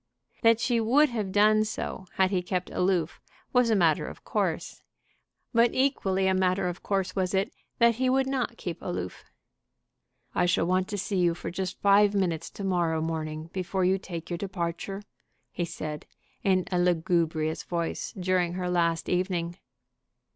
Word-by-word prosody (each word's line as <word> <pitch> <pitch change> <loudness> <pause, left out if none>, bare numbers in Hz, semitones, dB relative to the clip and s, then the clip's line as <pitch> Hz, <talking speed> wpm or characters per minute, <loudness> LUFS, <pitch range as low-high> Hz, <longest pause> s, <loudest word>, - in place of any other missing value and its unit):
That 230 -1 +5
she 240 -1 +1
would 270 +7 +4
have 215 -5 -3
done 215 +2 +5
so 210 -3 -5
had 190 0 +3
he 185 -2 +1
kept 180 0 -3
aloof 180 -3 0 0.3
was 250 -2 +4
a 220 - +4
matter 165 -6 +3
of - - -10
course; - - -2 0.7
but 235 0 +4
equally 195 -8 +1
a 190 - +3
matter 185 0 +1
of 175 0 -4
course 195 -2 -1
was 190 -1 0
it 195 +9 0 0.2
that 235 -1 +4
he 260 0 +2
would 265 +1 +3
not 255 -3 -2
keep 175 -2 -5
aloof. 90 0 -5 1.1
"I 180 - +2
shall 175 -1 +2
want 185 +1 +1
to 205 - -4
see 200 0 -2
you 170 -2 +3
for 170 - -6
just 185 0 -4
five 205 +1 +5
minutes 170 -5 0
to 200 - -8
morrow 175 -4 +1
morning 155 0 -4
before 185 0 -1
you 190 +1 +3
take 170 -3 -7
your 175 - -1
departure," 190 +1 -4 0.5
he 175 - -2
said, 150 -2 -6 0.4
in 185 -2 +2
a 180 - +1
lugubrious 165 -2 +1
voice, 170 -2 -3
during 180 -2 0
her 180 0 -2
last 170 -2 +1
evening. 175 -1 -1
185 Hz, 170 wpm, -27 LUFS, 170-205 Hz, 1.1 s, That